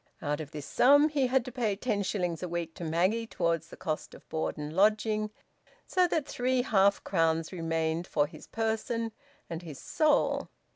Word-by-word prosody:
Out 150 0 -2
of 150 - -7
this 150 -2 -7
sum 285 +4 +5
he 280 -4 +1
had 255 -1 +2
to 255 - -6
pay 225 -5 0
ten 210 -1 -1
shillings 180 -4 -1
a 180 - -2
week 170 -1 -3
to - - -8
Maggie 185 +8 +1
towards 170 -5 -1
the - - -11
cost 155 -1 -4
of - - -17
board 160 +1 -2
and 150 +1 -5
lodging, 215 +2 +3 0.6
so 365 -1 +3
that 320 -4 0
three 250 -1 0
half 200 -4 +3
crowns 165 -3 +1
remained 165 -1 -1
for 145 -2 +2
his 155 0 -12
person 225 +1 -1 0.4
and 165 0 -5
his 155 -6 -8
soul. 310 -1 +1
190 Hz, 185 wpm, -30 LUFS, 165-230 Hz, 0.6 s, sum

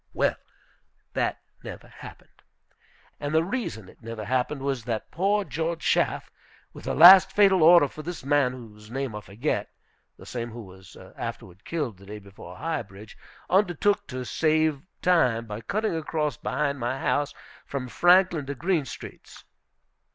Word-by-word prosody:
Well, - - +2 0.8
that - - -1 0.2
never - - -9
happened. - - -14 0.8
And 145 +2 -3
the 160 - +4
reason 180 - -4
it - - -18
never 115 -2 -7
happened 130 +4 -1
was, 135 -4 -2
that 115 -3 -4
poor 200 +4 +1
George 165 -2 -3
Schaff, - - 0 0.4
with - - -12
the - - -2
last 190 +4 +9
fatal 195 -3 +4
order 170 -1 +7
for 155 - -10
this 170 -3 -7
man 140 -3 +2
whose 105 -4 -12
name 135 -2 -4
I 105 - -5
forget 110 +9 -3 0.5
(the - - -14
same 120 -1 -5
who 115 0 -9
was 95 -1 -15 0.2
afterward 95 +2 -7
killed 145 - -3
the 100 +1 -16
day 105 +1 -7
before 100 -1 -12
High 160 -3 -2
Bridge), 100 0 -13 0.3
undertook 195 +1 +2
to 130 -3 -5
save 155 0 +1 0.2
time 125 -11 +3
by 105 0 -7
cutting 215 - -1
across 155 -3 -2
behind 140 +3 -2
my 120 +2 -2
house, 145 +1 0 0.3
from 135 -2 -4
Franklin 175 -1 +3
to 140 - -4
Green 165 +1 0
Streets. - - -11
140 Hz, 160 wpm, -26 LUFS, 115-165 Hz, 0.8 s, last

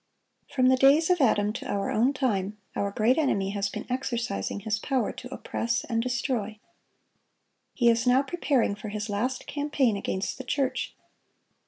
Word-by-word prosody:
(896) - - -16
From 255 -2 +4
the 260 +1 +6
days 320 +2 0
of 355 -3 +2
Adam 210 -4 +3
to 245 - -6
our 200 -1 -1
own 240 +5 +3
time, 215 -7 -1 0.2
our 200 - 0
great 225 +7 +2
enemy 200 -10 +1
has 200 -1 -1
been - - -6
exercising 240 -5 -2
his 215 0 -1
power 260 +1 0
to - - -10
oppress 235 +1 -2
and 230 -2 -1
destroy. 240 -3 -2 1.2
He 240 - +2
is 230 +1 +3
now 255 +2 +5
preparing 275 -7 +1
for 210 +1 -7
his 210 +1 -4
last 245 +6 -2
campaign 285 -6 0
against 195 +3 -3
the - - -5
church. 265 0 -1
240 Hz, 170 wpm, -27 LUFS, 210-265 Hz, 1.2 s, the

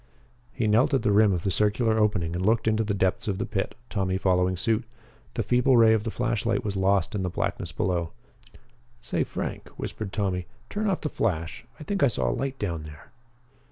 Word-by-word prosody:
He 115 - -2
knelt 120 +7 +4
at 135 - 0
the 105 - +2
rim 105 0 +5
of 90 -2 -1
the 95 - 0
circular 110 +3 +2
opening 95 -6 +1
and 90 - -2
looked 110 +2 +2
into 110 0 +2
the 100 -1 -1
depths 95 +1 0
of 100 -3 -1
the - - -2
pit, 95 - -3
Tommy 95 -4 -1
following 90 -1 +2
suit. 110 +5 +1 0.5
The 115 - 0
feeble 125 +3 +3
ray 110 -1 +7
of 110 -1 0
the - - -1
flashlight 115 -1 -1
was 100 -1 -2
lost 95 -1 +2
in 105 - -1
the 90 - -1
blackness - - -2
below. 85 -2 -1 0.9
"Say, - - -1
Frank," - - -5
whispered 105 -3 -5
Tommy, 95 -4 -1 0.2
"turn 210 0 0
off 190 - -1
the 150 - -2
flash. 90 - -2
I - - -7
think 200 +5 -2
I 140 - +6
saw 115 - 0
a - - -1
light 135 0 -3
down 85 -8 -3
there." 75 -1 -12
105 Hz, 210 wpm, -26 LUFS, 95-115 Hz, 0.9 s, ray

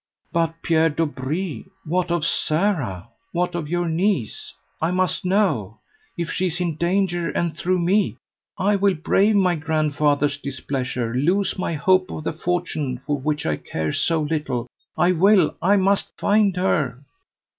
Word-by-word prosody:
"But, 165 -1 +1
Pierre 165 -1 +3
Dobree, 155 +2 -3 0.2
what 175 +2 0
of 170 -2 0
Sara? 155 - 0 0.2
what 180 +1 0
of 165 -4 -4
your 175 0 0
niece? 165 - -1 0.3
I 160 - +2
must 185 0 0
know. 180 - +1 0.4
If 170 -1 -2
she 185 - 0
is 175 0 -3
in 170 -4 -1
danger, 175 0 0
and 170 -3 -1
through 185 +2 0
me, 185 +4 +1 0.4
I 200 +2 +2
will 195 -1 +2
brave 200 +6 +2
my 185 -3 +3
grandfather's 150 -2 +1
displeasure, 130 -4 -3
lose 180 +10 +1
my 175 - -1
hope 185 +4 +3
of 155 - -6
the - - -2
fortune 155 -6 -2
for 145 -1 -1
which 150 +2 -2
I 75 -1 0
care 80 -1 -3
so 165 -2 +1
little. 150 -6 -2 0.3
I 175 +3 +4
will, 195 +3 +4
I 195 +5 +4
must 195 +1 +1
find 205 -2 +3
her!" 145 -8 0
165 Hz, 155 wpm, -22 LUFS, 150-185 Hz, 0.4 s, I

